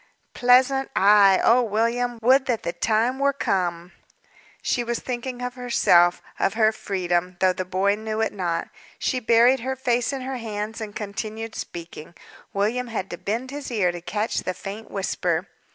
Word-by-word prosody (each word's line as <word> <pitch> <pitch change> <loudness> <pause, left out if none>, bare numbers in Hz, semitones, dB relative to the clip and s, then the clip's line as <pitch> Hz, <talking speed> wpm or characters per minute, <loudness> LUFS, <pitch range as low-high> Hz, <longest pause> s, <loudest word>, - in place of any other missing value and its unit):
"Pleasant? 260 +2 +4
Ay! 200 -1 +6
Oh, 245 +2 +5
William! 235 +2 0
Would 265 +3 +4
that 240 -4 -1
the 170 - -2
time 225 +7 +1
were 280 0 +2
come!" 180 -8 -1 0.7
She 245 - 0
was 235 0 -2
thinking 250 0 -5
of 250 0 -3
herself 180 -8 +3 0.2
of 195 - +1
her 220 -1 +4
freedom 180 -4 -2
though 185 -1 +3
the 185 - -4
boy 190 +2 +1
knew 215 +1 -4
it 225 - 0
not. 175 -4 -2 0.3
She 255 - -1
buried 235 +3 +4
her 260 +3 -3
face 245 -1 0
in 270 -1 -4
her 260 0 -4
hands 220 -1 -5
and 210 -2 -6
continued 215 +2 -5
speaking; 170 -1 -8 0.4
William 225 +5 -1
had 210 -5 -4
to 175 - -5
bend 235 +6 -3
his 290 0 -6
ear 205 -7 +1
to 175 0 -8
catch 210 +5 -2
the 185 - -4
faint 200 +5 -8
whisper. 180 -3 -1
220 Hz, 170 wpm, -24 LUFS, 190-245 Hz, 0.7 s, Ay